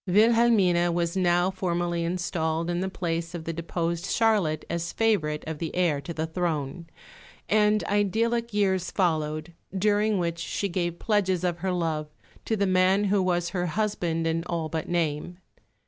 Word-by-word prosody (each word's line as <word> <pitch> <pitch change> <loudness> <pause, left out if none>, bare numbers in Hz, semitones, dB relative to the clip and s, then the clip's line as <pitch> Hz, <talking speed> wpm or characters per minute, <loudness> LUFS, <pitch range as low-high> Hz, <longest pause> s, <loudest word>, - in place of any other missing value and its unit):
Wilhelmine 200 -4 +4
was 170 0 0
now 175 0 +2
formally 175 -2 -1
installed 170 -1 -1
in 175 - -1
the 190 +1 -1
place 170 -2 -3
of 165 - -5
the 165 - -3
deposed 170 +1 -2
Charlotte 205 -11 +1
as 170 0 -3
favourite 170 -10 +1
of 160 -2 -4
the 165 -2 -4
heir 170 -6 +1
to 140 - -7
the 160 -1 -2
throne; 160 -2 -3 0.6
and 210 0 +3
idyllic 230 +4 0
years 190 -3 +1
followed, 155 -2 -1 0.2
during 210 +1 +2
which 170 -2 -1
she 200 +4 -2
gave 175 -1 -2
pledges 190 -5 +1
of 175 -1 -1
her 190 +2 -1
love 160 -4 -1 0.4
to 220 - 0
the 200 - +2
man 185 +1 +3
who 200 -1 +2
was 175 -2 0
her 180 -1 -2
husband 175 -3 -1
in 165 0 0
all 165 -3 -2
but 160 -1 -4
name. 170 0 -1
175 Hz, 165 wpm, -26 LUFS, 165-195 Hz, 0.6 s, Wilhelmine